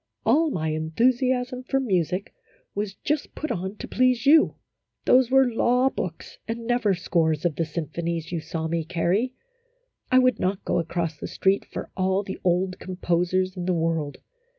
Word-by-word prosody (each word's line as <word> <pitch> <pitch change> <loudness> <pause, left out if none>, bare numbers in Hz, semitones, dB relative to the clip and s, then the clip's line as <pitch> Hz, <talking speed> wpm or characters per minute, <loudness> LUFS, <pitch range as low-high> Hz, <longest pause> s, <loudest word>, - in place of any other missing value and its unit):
" - - -48
All 320 +2 +4
my 160 - -2
enthusiasm 250 - +1
for 270 +1 0
music 185 - -1 0.4
was 205 -1 -3
just 300 +5 -2
put 310 - -3
on 190 -1 -3
to - - -7
please 250 -2 +2
you. 305 +2 +6 0.5
Those 250 -1 +5
were 265 0 +5
law 250 +3 +3
books, 165 -3 -6
and 230 +1 -4
never 235 -5 +2
scores 165 -3 0
of 165 -4 +1
the 165 - 0
symphonies, 165 +1 -4
you 170 - -1
saw 160 0 -4
me 165 0 -1
carry. 180 +9 0 0.8
I 255 - +6
would 255 0 +4
not 190 +1 -1
go - - +1
across 165 -1 -2
the - - -5
street 195 +1 +1
for - - -6
all 190 +1 +1
the 190 -1 -6
old 185 +1 +1
com 185 0 -6
posers 180 +1 0
in 180 -1 -4
the 180 - +2
world 165 -3 -1
185 Hz, 175 wpm, -25 LUFS, 170-245 Hz, 0.8 s, you